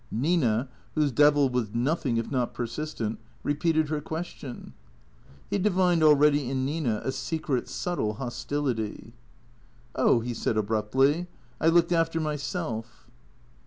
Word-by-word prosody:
Nina, 130 -3 +1 0.3
whose 150 -3 +2
devil 145 +2 +5
was 120 -4 -2
nothing 130 -1 0
if 115 - -2
not 125 -3 -1
persistent, 115 -3 -3 0.2
repeated 155 +1 +1
lier 150 -1 -1
question. 160 -5 -7 0.8
He 200 - +1
divined 180 -3 +2
already 150 -3 +5
in 130 -1 -1
Nina 135 -7 -1
a 130 - -1
secret, 135 0 -2
subtle 110 -12 -2
hostility. 120 -2 -3 0.4
" 120 0 -31
Oh," 120 - +4
he 120 +1 -3
said 110 -1 -1
abruptly. 120 - +1 0.2
" - - -29
I 160 - +3
looked 170 +1 +4
after 165 -1 +2
myself." 140 -7 -4
140 Hz, 130 wpm, -27 LUFS, 120-155 Hz, 0.8 s, devil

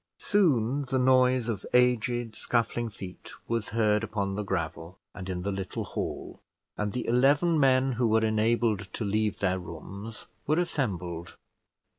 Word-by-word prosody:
Soon 145 - +2
the 130 +1 -1
noise 130 -1 +4
of 110 -5 -3
aged 120 -2 +2
scuffling 115 0 -1
feet 95 -3 -10
was 115 -2 -1
heard 105 -1 +2
upon 100 -3 -2
the 105 - -2
gravel 85 -2 -4 0.2
and 95 -1 -7
in 90 -1 -3
the 100 - -1
little 95 -1 -4
hall, - - -5 0.3
and 105 0 -2
the 125 - -3
eleven 145 +7 +3
men 135 -1 +4
who 120 -1 +1
were 110 0 +3
enabled 110 -2 +1
to 110 - -3
leave 105 +1 0
their 95 -1 0
rooms 100 +6 -8 0.2
were 155 +2 +2
assembled. 90 - -2
110 Hz, 150 wpm, -28 LUFS, 100-125 Hz, 0.3 s, noise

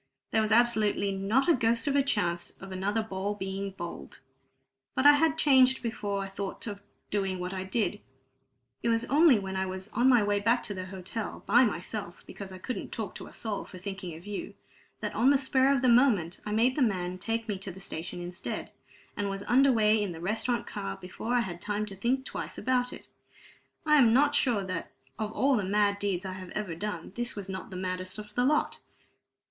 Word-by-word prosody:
There 220 - +3
was 215 0 0
absolutely 220 -3 +3
not 195 +7 +1
the 345 - +5
ghost 230 -2 +1
of 280 - +1
a 280 - +5
chance 175 -10 -1
of 195 0 -9
another 200 +4 -1
ball 200 0 -3
being 195 0 -4
bowled. 175 -3 -8 0.8
But 260 - +1
I 290 - +11
had 315 +1 +3
changed 260 -4 +5
before 205 -4 -2
I - - -5
thought 195 0 -5
of 205 -3 -6 0.3
doing 195 -2 0
what 180 +1 -4
I 185 -1 -3
did. 205 +1 -1 0.8
It 235 - 0
was 230 0 +1
only 290 0 +6
when 190 -1 -4
I 190 0 0
was 190 +2 -6
on 245 +4 +3
my 245 -4 +5
way 205 0 +1
back 230 +4 +2
to 205 - -4
the 185 -1 -5
hotel, 190 +4 -6
by 240 +6 +6
myself, 195 -2 -5
because 195 -2 -9
I 185 - -8
couldn't 250 +7 -5
talk - - -4
to - - -9
a - - -14
soul 215 -3 -3
for 185 - -11
thinking 190 -2 -6
of 165 +3 -12
you, 205 -1 -5 0.5
that - - -3
on 250 +4 +4
the 280 - +6
spur 265 0 +3
of 270 -2 +1
the - - +4
moment 235 -9 +4
I - - -2
made 235 +4 +3
the 295 - 0
man 185 -6 0
take 225 +3 -2
me 205 -3 -2
to 195 0 -6
the 185 - -11
station 175 -2 -5
instead, 175 +1 -5 0.4
and 205 -2 -1
was 195 0 -4
under 270 +4 +5
way 215 -2 +4
in 200 -4 -2
the 160 - -9
restaurant 220 +5 0
car 95 0 -5
before 220 +6 -4
I 245 - +4
had 175 -6 -5
time 210 0 -2
to 200 -2 -5
think 250 +7 0
twice - - -6
about 250 -1 +1
it. - - -10 0.8
I 300 0 +5
am 235 -5 +6
not 290 +3 +4
sure 235 -8 +2
that 185 -3 -4 0.3
of 215 -1 -2
all 275 +3 +3
the 210 - 0
mad 200 +1 +2
deeds 195 -2 -1
I 190 - -4
have 185 -1 -8
ever 210 -5 -2
done, 180 -1 -5
this 240 +1 -4
was 200 -2 -6
not 190 -1 -6
the 185 - -7
maddest 185 +1 -3
of 210 0 -9
the 245 +2 +2
lot!" 300 +3 +1
205 Hz, 220 wpm, -29 LUFS, 190-240 Hz, 0.8 s, I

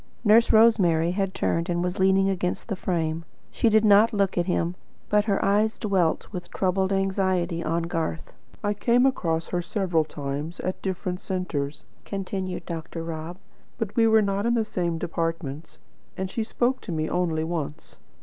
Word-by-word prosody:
Nurse 225 +1 +5
Rosemary 185 -8 +4
had 195 0 -1
turned 165 +2 0
and 175 0 0
was 180 +1 -2
leaning 190 +1 +4
against 180 +2 -2
the 200 - -1
frame. 165 -3 -2 0.3
She 230 - +2
did 220 0 +4
not 210 +2 +6
look 200 -2 +1
at 175 0 0
him, 175 -1 0 0.4
but 210 0 +3
her 200 -3 +2
eyes 210 +2 +2
dwelt 190 -6 +1
with 180 -3 -6
troubled 190 0 0
anxiety 190 -3 0
on 165 +1 0
Garth. 165 -1 -3 0.3
"I 205 0 +1
came 240 +4 +3
across 165 -11 0
her 175 - -1
several 175 -2 0
times, 145 +2 -5
at 185 - -3
different 180 -1 -3
centres," 150 -6 -3 0.2
continued 190 -2 -4
Dr. 165 0 -5
Rob; 165 +1 -6 0.4
"but 225 -4 -4
we 230 -1 +4
were 220 -1 +5
not 200 +2 0
in 235 - +2
the 225 -2 +1
same 170 -5 -2
departments, 165 -2 -4 0.4
and 190 0 -3
she 225 - -1
spoke 245 +3 0
to - - -7
me 155 -1 -1
only 165 -3 0
once. 160 -3 -5
185 Hz, 170 wpm, -25 LUFS, 165-200 Hz, 0.4 s, not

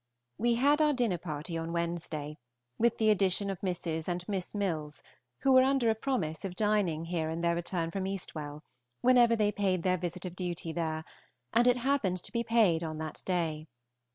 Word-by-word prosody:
We 235 0 +3
had 285 +5 +3
our 300 -1 +4
dinner 235 -9 0
party 160 0 -5
on 165 +1 -4
Wednesday, 165 -3 -3 0.4
with 235 0 +3
the 220 -1 +4
addition 195 0 +2
of 190 - -6
Mrs. 170 -4 -2
and 180 0 -3
Miss 195 -1 -3
Milles, 160 -7 -2 0.4
who 270 - +3
were 260 0 +8
under 260 -3 +3
a - - +2
promise 220 - -2
of 190 -2 -4
dining 200 -6 +1
here 165 -2 -2
in 165 +1 -3
their 170 0 +2
return 170 -1 -2
from 190 +1 -2
Eastwell, 155 -6 -5 0.4
whenever 245 -2 +5
they 210 -2 +2
paid 190 -4 0
their 185 -1 +2
visit 180 +1 -4
of 180 -1 -6
duty 175 -2 -3
there, 160 -1 -2 0.5
and 240 +1 +4
it 250 0 +5
happened 245 -8 +1
to - - -9
be 235 0 0
paid 215 -8 +3
on 155 -1 -4
that 155 0 -5
day. 165 -4 -1
180 Hz, 190 wpm, -31 LUFS, 165-220 Hz, 0.5 s, were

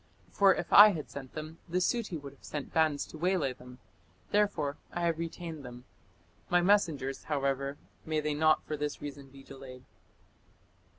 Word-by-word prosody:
For 195 -2 +5
if - - -4
I 205 0 +10
had 155 -4 -6
sent 135 -2 -8
them, 155 +1 -7
the 175 - 0
Suti 185 -2 0
would 140 -1 -10
have 140 - -25
sent 145 -2 -6
bands 155 -3 +2
to 155 - -11
waylay 175 -6 +1
them; 125 0 -14 0.5
therefore 200 -9 +1
I 175 - -4
have 165 -1 0
retained 165 -2 -6
them. 125 0 -10 0.6
My 175 - +4
messengers 165 -8 +1
(however), 140 -1 -1 0.3
may 155 -1 -1
they 150 0 -1
not 155 +1 +3
(for 155 - -3
this 150 0 -3
reason) 140 -1 -8
be 135 0 -14
delayed." 130 -2 -11
150 Hz, 170 wpm, -31 LUFS, 140-170 Hz, 0.6 s, I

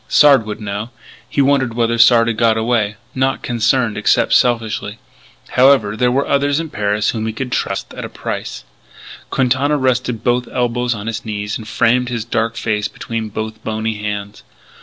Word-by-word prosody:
Sard 140 -7 +5
would 105 - -5
know. 105 +1 -4 0.4
He 140 - +2
wondered 135 -4 +1
whether 115 0 0
Sard 115 0 +6
had 115 - 0
got 115 0 +2
away, 110 -2 0 0.2
not 135 +1 0
concerned 120 -1 +1
except 105 - +2
selfishly. 110 -3 +1 0.5
However, 125 -5 +4
there 125 +3 +2
were 135 +3 +1
others 140 +1 +1
in 165 -2 -5
Paris 105 +1 0
whom 110 -1 -3
he - - -1
could 125 +2 -5
trust 100 - -2
at - - -7
a - - -6
price.... - - -5 0.7
Quintana 135 +3 +1
rested 125 -3 0
both 125 0 +1
elbows 125 0 0
on 105 -1 -7
his 115 -1 -4
knees 105 -1 -4
and 110 - -10
framed 125 +3 +2
his 115 -3 -3
dark 115 0 -1
face 105 -2 -1
between 115 0 -5
both 110 +1 -6
bony 110 0 -3
hands. 105 0 -5
115 Hz, 175 wpm, -17 LUFS, 110-125 Hz, 0.7 s, Sard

